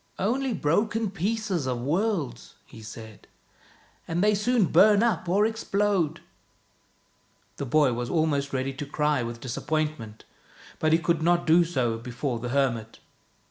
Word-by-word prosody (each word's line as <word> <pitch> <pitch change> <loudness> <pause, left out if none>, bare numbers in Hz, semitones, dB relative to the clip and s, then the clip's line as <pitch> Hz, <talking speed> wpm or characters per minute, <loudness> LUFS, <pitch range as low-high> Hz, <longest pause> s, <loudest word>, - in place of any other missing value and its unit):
" - - -36
Only 265 +1 -1
broken 205 +6 0
pieces 195 -4 -2
of 125 -2 -2
worlds," 160 - -2
he 110 - -13
said, 110 -1 -11 0.4
" - - -31
and 170 +3 0
they 210 0 +4
soon 215 +1 +2
bum 210 +4 +5
up 230 -6 0
or 200 +4 +3
explode." 205 -6 0 1.4
The 140 - -4
boy 145 -1 +3
was 120 0 -3
almost 145 -4 0
ready 135 0 -2
to 140 +2 -6
cry 150 -1 0
with 120 0 -5
disappoint 155 +4 -2
ment, 110 -1 -11 0.5
but 155 - +1
he 160 - +5
would 170 0 0
not 175 +1 +2
do 170 +2 +5
so 125 -9 -1
before 125 +1 -4
the 120 +1 -5
hermit. 120 -5 -1
155 Hz, 155 wpm, -26 LUFS, 125-200 Hz, 1.4 s, bum